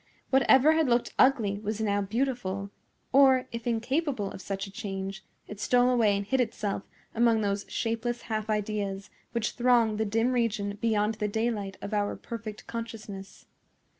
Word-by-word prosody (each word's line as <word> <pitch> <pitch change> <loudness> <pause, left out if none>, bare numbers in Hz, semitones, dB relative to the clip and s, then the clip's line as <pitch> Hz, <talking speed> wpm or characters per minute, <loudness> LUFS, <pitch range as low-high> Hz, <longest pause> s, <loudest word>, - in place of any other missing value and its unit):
Whatever 265 +2 +6
had 315 -3 +2
looked 240 0 +1
ugly 220 -7 +4
was 215 +1 -3
now 205 -2 +1
beautiful; 200 -3 -2 0.4
or, 265 -2 +6
if 230 0 -5
incapable 240 - -1
of - - -8
such 195 0 -4
a 195 - -11
change, 195 -3 -5 0.2
it 210 - -9
stole 245 +3 +3
away 220 -5 +3
and 200 - -3
hid 260 +5 +2
itself 215 -4 -2 0.3
among 230 -1 +3
those 200 -1 -1
shapeless 230 +1 -2
half 215 -1 -3
ideas 205 -2 -2 0.2
which 230 -2 0
throng 240 -3 +3
the 220 - 0
dim 225 +4 +1
region 210 -4 -1
beyond 215 -1 +2
the 210 - 0
daylight 210 -3 -2
of 200 - -5
our 205 -1 0
perfect 215 -2 -7
consciousness. 215 -4 -7
220 Hz, 160 wpm, -28 LUFS, 200-240 Hz, 0.4 s, Whatever